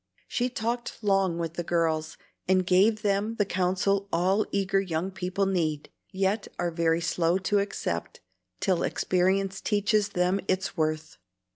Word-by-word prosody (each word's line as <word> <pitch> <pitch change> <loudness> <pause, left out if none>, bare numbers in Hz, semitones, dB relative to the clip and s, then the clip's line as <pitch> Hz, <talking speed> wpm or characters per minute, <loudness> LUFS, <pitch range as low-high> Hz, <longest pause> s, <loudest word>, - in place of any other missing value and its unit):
She 245 +1 0
talked 240 0 -3
long 195 -4 +2
with 165 -1 -3
the 175 - -3
girls, 160 -2 0 0.3
and 185 0 +3
gave 205 +4 +3
them 205 +2 0
the 205 - +1
counsel 190 +1 0
all 190 +5 +2
eager 195 0 +1
young 180 0 -2
people 185 +1 -1
need, 160 -6 -1 0.2
yet 195 +2 0
are 175 -1 -1
very 165 0 +1
slow 165 +2 +1
to 195 +2 +1
accept 195 - -3 0.4
till 185 -3 +1
experience 190 +2 0
teaches 210 0 +1
them 180 +1 +1
its 190 0 -1
worth. 155 -1 -2
190 Hz, 145 wpm, -27 LUFS, 170-200 Hz, 0.4 s, and